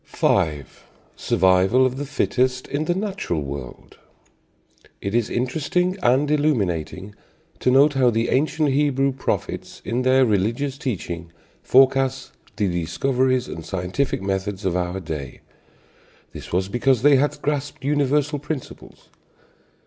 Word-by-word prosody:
V. 75 Hz, -3 st, 0 dB, 0.5 s
SURVIVAL 95 Hz, +7 st, +3 dB
OF 130 Hz, 0 st, -1 dB
THE 145 Hz, 0 st, -4 dB
FITTEST 130 Hz, -1 st, 0 dB
IN 145 Hz, +3 st, -2 dB
THE 175 Hz, -, 0 dB
NATURAL 190 Hz, -, -2 dB
WORLD. 70 Hz, -3 st, -8 dB, 1.0 s
It 100 Hz, -, -4 dB
is 120 Hz, -2 st, +1 dB
interesting 160 Hz, +8 st, -1 dB
and 140 Hz, +1 st, +2 dB
illuminating 100 Hz, -, -1 dB, 0.5 s
to -, -, +1 dB
note 140 Hz, +3 st, +5 dB
how 130 Hz, -3 st, +3 dB
the 115 Hz, 0 st, 0 dB
ancient 150 Hz, +2 st, +1 dB
Hebrew 135 Hz, -1 st, +2 dB
prophets 130 Hz, 0 st, -4 dB
in 120 Hz, +2 st, -1 dB
their 130 Hz, +1 st, +4 dB
religious 115 Hz, +7 st, -1 dB
teaching 85 Hz, -, -4 dB, 0.3 s
forecast 135 Hz, 0 st, +3 dB, 0.2 s
the 105 Hz, -, 0 dB
discoveries 125 Hz, +9 st, 0 dB
and 80 Hz, -, -7 dB
scientific 95 Hz, -, -2 dB
methods 95 Hz, +1 st, -3 dB
of 90 Hz, -2 st, 0 dB
our 90 Hz, +1 st, -2 dB
day. 75 Hz, -7 st, -7 dB, 0.9 s
This -, -, -10 dB
was 95 Hz, +2 st, 0 dB
because 120 Hz, +3 st, +1 dB
they 145 Hz, -1 st, +6 dB
had 145 Hz, +3 st, 0 dB
grasped 145 Hz, -2 st, -3 dB
universal 145 Hz, +1 st, +1 dB
principles. 145 Hz, -1 st, -8 dB
130 Hz, 125 wpm, -22 LUFS, 95-140 Hz, 1.0 s, they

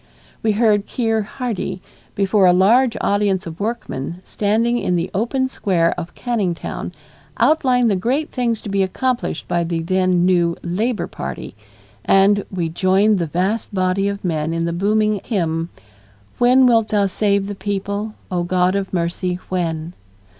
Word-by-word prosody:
We 220 Hz, -1 st, +2 dB
heard 210 Hz, -2 st, +2 dB
Keir 225 Hz, -3 st, 0 dB, 0.2 s
Hardie 215 Hz, -7 st, -3 dB, 0.4 s
before 195 Hz, -1 st, +3 dB
a 180 Hz, -, +6 dB
large 230 Hz, +7 st, +4 dB
audience 200 Hz, -2 st, +1 dB
of 165 Hz, 0 st, -8 dB
workingmen 200 Hz, -, -4 dB
standing 225 Hz, +5 st, 0 dB
in 180 Hz, -, 0 dB
the 170 Hz, +1 st, -2 dB
open 250 Hz, +6 st, 0 dB
square 180 Hz, -9 st, +1 dB
of 175 Hz, -1 st, -7 dB
Canning 215 Hz, -8 st, -1 dB
Town -, -, -6 dB, 0.5 s
outline 255 Hz, -6 st, +3 dB
the 205 Hz, -, +2 dB
great 255 Hz, +11 st, -1 dB
things 235 Hz, -4 st, -1 dB
to -, -, -6 dB
be 200 Hz, 0 st, +1 dB
accomplished 240 Hz, 0 st, -1 dB
by 175 Hz, 0 st, 0 dB
the 165 Hz, -1 st, -2 dB
then 185 Hz, 0 st, +2 dB
new 175 Hz, -2 st, +2 dB
Labor 210 Hz, +7 st, -1 dB
Party, -, -, -7 dB, 0.5 s
and 200 Hz, +1 st, +4 dB
we 175 Hz, -3 st, -2 dB
joined 190 Hz, +4 st, +2 dB
the 170 Hz, -, -1 dB
vast 190 Hz, +8 st, -1 dB
body 185 Hz, +1 st, +1 dB
of 200 Hz, -1 st, -4 dB
men 160 Hz, -1 st, -1 dB
in 165 Hz, 0 st, -1 dB
the 170 Hz, -, -2 dB
booming 210 Hz, +2 st, +1 dB
hymn 165 Hz, -6 st, -1 dB, 0.7 s
When 250 Hz, +2 st, +5 dB
wilt 230 Hz, -3 st, +4 dB
Thou 205 Hz, -2 st, +2 dB
save 200 Hz, 0 st, +1 dB
the 205 Hz, -, -4 dB
people, 200 Hz, +2 st, -3 dB, 0.2 s
O 180 Hz, -1 st, 0 dB
God 180 Hz, +1 st, +1 dB
of 195 Hz, -1 st, -2 dB
Mercy, 180 Hz, +1 st, -1 dB
when! 170 Hz, -2 st, -2 dB
195 Hz, 160 wpm, -20 LUFS, 175-220 Hz, 0.7 s, a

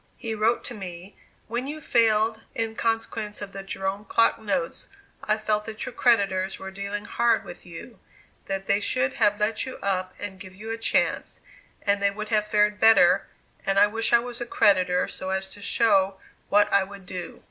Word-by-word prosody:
He 225 Hz, -2 st, -4 dB
wrote 220 Hz, +2 st, +1 dB
to -, -, -6 dB
me: 185 Hz, -2 st, -8 dB, 0.3 s
"when 240 Hz, +4 st, -3 dB
you 305 Hz, +2 st, -5 dB
failed 225 Hz, -4 st, +2 dB
in 225 Hz, -1 st, -2 dB
consequence 225 Hz, -2 st, -2 dB
of 205 Hz, -1 st, -6 dB
the 195 Hz, -, -7 dB
Jerome 195 Hz, +1 st, -4 dB
clock 230 Hz, 0 st, +3 dB
notes, 190 Hz, -6 st, -2 dB, 0.4 s
I 215 Hz, 0 st, +1 dB
felt 215 Hz, -1 st, -1 dB
that 220 Hz, -1 st, -5 dB
your -, -, -6 dB
creditors 195 Hz, -6 st, +2 dB
were 190 Hz, 0 st, -8 dB
dealing 200 Hz, +1 st, -5 dB
hard 235 Hz, +2 st, +2 dB
with -, -, -11 dB
you; -, -, -10 dB, 0.5 s
that 195 Hz, 0 st, -3 dB
they 200 Hz, +1 st, +2 dB
should 255 Hz, +5 st, 0 dB
have 205 Hz, 0 st, +4 dB
let 210 Hz, +1 st, +1 dB
you 260 Hz, -, -7 dB
up 185 Hz, -2 st, -1 dB
and 195 Hz, -2 st, -6 dB
give 185 Hz, -2 st, -11 dB
you 220 Hz, +3 st, -7 dB
a 225 Hz, -, -3 dB
chance, 225 Hz, -, 0 dB, 0.4 s
and 200 Hz, -1 st, +2 dB
they 200 Hz, -, +4 dB
would 215 Hz, +1 st, -6 dB
have 210 Hz, -1 st, +2 dB
fared 210 Hz, 0 st, +2 dB
better 220 Hz, -6 st, +6 dB, 0.4 s
and 195 Hz, 0 st, 0 dB
I 200 Hz, -, +8 dB
wish 225 Hz, +2 st, -1 dB
I -, -, +8 dB
was 240 Hz, 0 st, -5 dB
a -, -, -2 dB
creditor 185 Hz, -5 st, +3 dB
so 190 Hz, -, -6 dB
as 190 Hz, 0 st, -1 dB
to 205 Hz, -, -12 dB
show 195 Hz, -3 st, +2 dB, 0.3 s
what 205 Hz, 0 st, +4 dB
I 200 Hz, -, +5 dB
would 195 Hz, 0 st, -11 dB
do." 180 Hz, -1 st, -7 dB
205 Hz, 195 wpm, -25 LUFS, 195-225 Hz, 0.5 s, I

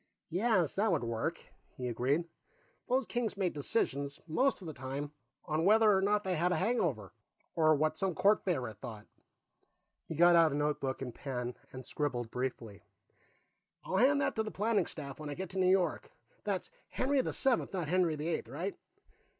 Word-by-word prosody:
"Yes, 185 Hz, -3 st, +2 dB
that 210 Hz, 0 st, +3 dB
would 155 Hz, -7 st, +1 dB
work," 115 Hz, -1 st, -2 dB, 0.4 s
he 125 Hz, -, -3 dB
agreed. 130 Hz, +7 st, +1 dB, 0.7 s
"Those 255 Hz, +1 st, +2 dB
kings 235 Hz, -4 st, -2 dB
made 185 Hz, -3 st, 0 dB
decisions, 140 Hz, -2 st, -1 dB
most 260 Hz, -, +2 dB
of 190 Hz, -, -11 dB
the 160 Hz, -, -5 dB
time, 140 Hz, +2 st, -5 dB, 0.3 s
on 155 Hz, +1 st, 0 dB
whether 215 Hz, +2 st, +6 dB
or 190 Hz, -, +2 dB
not 205 Hz, +1 st, +2 dB
they 190 Hz, -, -1 dB
had 175 Hz, +3 st, +1 dB
a -, -, +2 dB
hangover, 170 Hz, -, 0 dB, 0.4 s
or 155 Hz, -1 st, +4 dB
what 155 Hz, +2 st, 0 dB
some 190 Hz, -3 st, -1 dB
court 205 Hz, +5 st, +3 dB
favorite 125 Hz, -, -2 dB
thought." 110 Hz, -4 st, -8 dB, 1.0 s
He 160 Hz, -, -5 dB
got 175 Hz, +2 st, +6 dB
out 165 Hz, -2 st, +6 dB
a -, -, -2 dB
notebook 145 Hz, -3 st, -1 dB
and 125 Hz, -2 st, -6 dB
pen 125 Hz, -3 st, -4 dB, 0.2 s
and 130 Hz, -1 st, -8 dB
scribbled 120 Hz, -6 st, -2 dB
briefly. 120 Hz, -6 st, -4 dB, 1.0 s
"I'll 190 Hz, -, -1 dB
hand 275 Hz, +6 st, +5 dB
that -, -, 0 dB
to -, -, +3 dB
the 220 Hz, -, -3 dB
planning 215 Hz, +1 st, +1 dB
staff 140 Hz, -3 st, -6 dB
when 150 Hz, -1 st, -6 dB
I 145 Hz, -, -4 dB
get 185 Hz, -1 st, -5 dB
to 190 Hz, -, -3 dB
New 185 Hz, -1 st, +4 dB
York. 185 Hz, -4 st, +1 dB, 0.4 s
That's 195 Hz, -3 st, -2 dB, 0.2 s
Henry 270 Hz, +1 st, +1 dB
the -, -, -2 dB
Seventh, 265 Hz, -3 st, +1 dB
not 180 Hz, -5 st, -2 dB
Henry 175 Hz, -1 st, +2 dB
the 150 Hz, +2 st, -4 dB
Eighth? 165 Hz, -, -2 dB
Right. 165 Hz, -, -4 dB
165 Hz, 185 wpm, -32 LUFS, 135-195 Hz, 1.0 s, whether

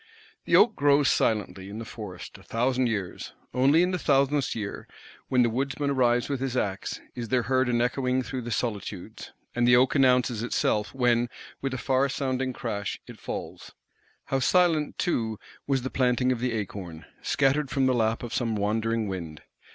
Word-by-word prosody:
The -, -, +3 dB
oak 225 Hz, -, +6 dB
grows 145 Hz, 0 st, +4 dB
silently, 100 Hz, -3 st, 0 dB
in 105 Hz, -, -7 dB
the 115 Hz, -, -6 dB
forest, 100 Hz, -6 st, -8 dB
a -, -, -16 dB
thousand 125 Hz, +2 st, 0 dB
years; 100 Hz, -6 st, -4 dB, 0.2 s
only 140 Hz, +6 st, +4 dB
in 180 Hz, -, +1 dB
the 180 Hz, -, -1 dB
thousandth 140 Hz, -1 st, +2 dB
year, 105 Hz, -3 st, -5 dB, 0.4 s
when 125 Hz, -1 st, +3 dB
the 120 Hz, -, +2 dB
woodman 140 Hz, +3 st, -1 dB
arrives 120 Hz, -2 st, +2 dB
with 140 Hz, -2 st, -2 dB
his 130 Hz, -1 st, -2 dB
axe, 100 Hz, -4 st, -2 dB
is 120 Hz, -1 st, -5 dB
there 130 Hz, -2 st, +2 dB
heard 130 Hz, 0 st, +1 dB
an 120 Hz, -1 st, +2 dB
echoing 125 Hz, +1 st, 0 dB
through 125 Hz, +2 st, -4 dB
the 120 Hz, -, -6 dB
solitudes; 105 Hz, -5 st, -4 dB, 0.2 s
and 120 Hz, 0 st, +2 dB
the 120 Hz, -, +7 dB
oak 130 Hz, +2 st, +4 dB
announces 125 Hz, -4 st, +3 dB
itself 105 Hz, -3 st, 0 dB
when, 120 Hz, -2 st, +2 dB, 0.3 s
with 135 Hz, -, -2 dB
a 130 Hz, -, -3 dB
far 135 Hz, +1 st, +1 dB
sounding 130 Hz, -1 st, -1 dB
crash, 105 Hz, -5 st, -4 dB
it -, -, -12 dB
falls. -, -, -7 dB, 0.5 s
How 135 Hz, -, 0 dB
silent 155 Hz, +3 st, +2 dB
too 115 Hz, -, -1 dB, 0.3 s
was 135 Hz, -3 st, +1 dB
the 130 Hz, -, -4 dB
planting 125 Hz, 0 st, +2 dB
of 125 Hz, -, -1 dB
the 125 Hz, 0 st, -1 dB
acorn; 95 Hz, -6 st, -5 dB, 0.2 s
scattered 135 Hz, +1 st, +1 dB
from 135 Hz, -1 st, +1 dB
the 130 Hz, -, +3 dB
lap 115 Hz, -1 st, 0 dB
of 120 Hz, -, -6 dB
some 115 Hz, -3 st, 0 dB
wandering 110 Hz, +2 st, 0 dB
wind! 85 Hz, -5 st, -6 dB
125 Hz, 180 wpm, -27 LUFS, 110-135 Hz, 0.5 s, the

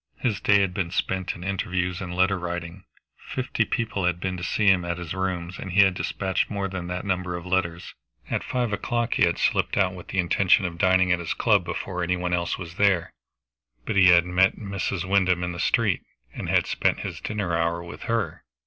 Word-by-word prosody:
His 110 Hz, -6 st, -1 dB
day 100 Hz, -1 st, +4 dB
had 95 Hz, -2 st, 0 dB
been 90 Hz, -2 st, -2 dB
spent 95 Hz, +1 st, -2 dB
in 90 Hz, -, -9 dB
interviews 90 Hz, -1 st, -2 dB
and 90 Hz, -2 st, -5 dB
letter 95 Hz, +1 st, +2 dB
writing; 90 Hz, +1 st, -5 dB, 0.3 s
fifty 125 Hz, -3 st, -2 dB
people 110 Hz, -7 st, -2 dB
had 90 Hz, -1 st, +1 dB
been 95 Hz, 0 st, -2 dB
to 90 Hz, -, -7 dB
see 105 Hz, +4 st, 0 dB
him 95 Hz, -3 st, +5 dB
at 85 Hz, -1 st, -3 dB
his 90 Hz, -1 st, -5 dB
rooms, 90 Hz, -2 st, -3 dB
and 95 Hz, -, -6 dB
he 100 Hz, -, +6 dB
had 95 Hz, -1 st, +3 dB
dispatched 95 Hz, 0 st, -1 dB
more 100 Hz, -2 st, -2 dB
than 95 Hz, -2 st, -5 dB
that 90 Hz, +1 st, -4 dB
number 90 Hz, -2 st, -1 dB
of 85 Hz, 0 st, -7 dB
letters. 90 Hz, -2 st, -1 dB, 0.3 s
At -, -, -2 dB
five 120 Hz, -4 st, -1 dB
o'clock 120 Hz, +3 st, -1 dB
he -, -, +4 dB
had 85 Hz, -, -1 dB
slipped -, -, +1 dB
out 95 Hz, -2 st, +2 dB
with 90 Hz, -2 st, -10 dB
the -, -, -5 dB
intention 95 Hz, +2 st, +3 dB
of 85 Hz, -1 st, -5 dB
dining 95 Hz, 0 st, +4 dB
at 90 Hz, -, +2 dB
his 85 Hz, -, -3 dB
club 105 Hz, -5 st, +3 dB
before 90 Hz, +1 st, -4 dB
any 90 Hz, +1 st, 0 dB
one 90 Hz, 0 st, -2 dB
else 85 Hz, -1 st, 0 dB
was 85 Hz, -1 st, -9 dB
there, 95 Hz, -5 st, +2 dB, 0.7 s
but -, -, -2 dB
he 95 Hz, -2 st, +6 dB
had 85 Hz, -1 st, +6 dB
met 90 Hz, +2 st, +3 dB
Mrs. 100 Hz, -3 st, -3 dB
Wyndham 90 Hz, -2 st, +2 dB
in 90 Hz, -, -2 dB
the 85 Hz, -, -7 dB
street, 105 Hz, -3 st, +2 dB, 0.3 s
and -, -, -5 dB
had -, -, +3 dB
spent -, -, 0 dB
his -, -, -6 dB
dinner 105 Hz, -6 st, -2 dB
hour 85 Hz, +1 st, 0 dB
with 85 Hz, -, -9 dB
her. 115 Hz, -2 st, -2 dB
90 Hz, 220 wpm, -25 LUFS, 90-100 Hz, 0.7 s, he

